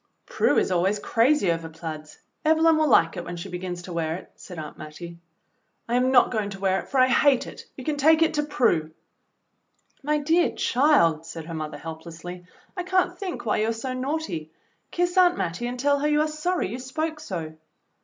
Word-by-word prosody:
"Prue - - +1
is - - +2
always 185 +3 +2
crazy 230 - +2
over 165 -1 -3
plaids. 160 -1 -8 0.3
Evelyn 320 +1 +4
will 310 -1 +2
lilce 165 -6 +4
it 175 - -4
when 175 - -6
she 170 +3 -7
begins 180 0 -5
to 175 - -8
wear 160 -1 -1
it," 180 - -10
said 180 - -11
Aunt 155 -2 -7
Mattie. 170 +3 -9 0.7
"I 235 - -3
am 250 +1 +3
not 245 -2 +5
going 215 -4 -1
to 195 -1 -8
wear 190 0 +1
it, - - -9
for 270 - +1
I 255 - +6
hate 265 +1 +3
it. - - -10
You 260 - -7
can 295 +2 -2
take 315 +3 +5
it 320 - +1
to 300 - +1
Prue." 235 - +1 1.1
"My 300 +1 +1
dear 325 +4 +2
child," 170 - +3
said 165 -1 -7
her 165 - -7
mother 155 -1 -5
helplessly. 165 +2 -9 0.3
"I 365 - -2
can't 365 0 +1
think 375 -9 -5
why 215 - +1
you 215 - +1
are - - 0
so 255 +3 -4
naughty. 255 - -3 0.4
Kiss 355 +1 -1
Aunt 355 -1 +5
Mattie 180 +8 -2
and 245 0 -5
tell 285 +2 +2
her 295 - 0
you 300 0 +3
are 310 - +1
sorry 310 - -1
you 240 +5 -5
spoke 310 +5 -3
so." 170 - -5
235 Hz, 210 wpm, -25 LUFS, -, 1.1 s, I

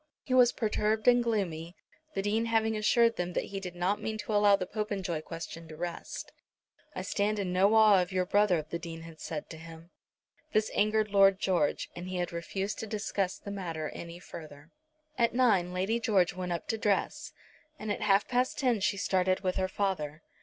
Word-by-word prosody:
He 255 - -3
was 250 -2 +6
perturbed 215 0 0
and 245 -1 +6
gloomy, 180 -7 -2 0.4
the 195 - -1
Dean 215 +3 +1
having 225 -1 +1
assured 230 +2 +3
them 180 0 -2
that - - 0
he 195 - -2
did 180 -2 -7
not 180 +4 0
mean 220 0 -3
to 215 0 -4
allow 205 -1 +6
the 185 - -3
Popenjoy 195 -5 -3
question 165 0 -8
to 155 -1 -10
rest. 175 0 -5 0.6
"I - - -3
stand 210 +1 0
in 190 -3 -2
no 195 +4 +4
awe 215 -4 +7
of 180 +1 -3
your 185 -1 +1
brother," 185 -5 +2
the 170 +2 -4
Dean 165 -1 -7
had 165 -1 -12
said 155 -2 -5
to 160 - -8
him. 165 +1 -12 0.6
This 215 0 +2
had - - -3
angered 215 0 +2
Lord 195 -1 +5
George, 175 -6 +1
and 175 +1 -6
he 185 - -4
had 175 -1 -2
refused 190 +4 -3
to 220 - -4
discuss 205 -3 -2
the 200 - -8
matter 165 -6 -4
any 170 0 -8
further. 155 -3 -11 0.5
At 235 0 +2
nine 205 -9 +3
Lady 190 +6 0
George 195 -7 +2
went 180 0 -4
up 170 - -3
to 225 - -1
dress, 205 -2 0 0.5
and 215 -4 -4
at 205 - -3
half 200 -1 +3
past 250 +1 0
ten 250 -6 +2
she 200 +1 0
started 185 -1 +1
with 185 -1 -1
her 190 0 +1
father. 170 -6 -2
195 Hz, 205 wpm, -30 LUFS, 175-215 Hz, 0.6 s, awe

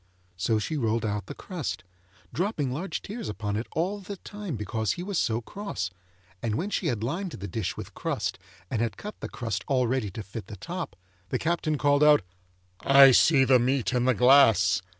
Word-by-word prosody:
So 95 +5 +1
she 150 +9 -2
rolled 115 -3 0
out 105 -2 -2
the - - -7
crust, 140 - -5 0.5
dropping 165 - -1
large 170 +9 -4
tears 220 - -6
upon 105 -1 -3
it 110 +3 -3
all 185 +6 -1
the 200 +1 -7
time 205 -5 -6
because 105 0 -1
he 175 - -6
was 195 -2 -1
so 115 +1 0
cross, 120 - -5 0.5
and 110 -2 -1
when 195 - -2
she 180 - -1
had 115 -6 -1
lined 170 +9 -3
the 100 - -6
dish 100 0 -3
with - - -8
crust - - -3 0.3
and 110 - 0
had 115 -1 -1
cut 210 +1 -8
the - - -5
crust 105 -4 -3
all 130 -2 +2
ready 120 -3 0
to 105 +4 -7
fit 100 +2 -8
the 105 - -8
top, 175 - -5 0.3
the - - 0
Captain 160 -2 0
called 145 +1 +3
out, 150 -5 +6 0.6
'I 140 -1 +8
see 135 +2 +5
the 130 -1 +5
meat 130 +1 +1
in 125 -1 +1
the 130 -1 +3
glass! 115 -8 +5
130 Hz, 200 wpm, -27 LUFS, 110-165 Hz, 0.6 s, I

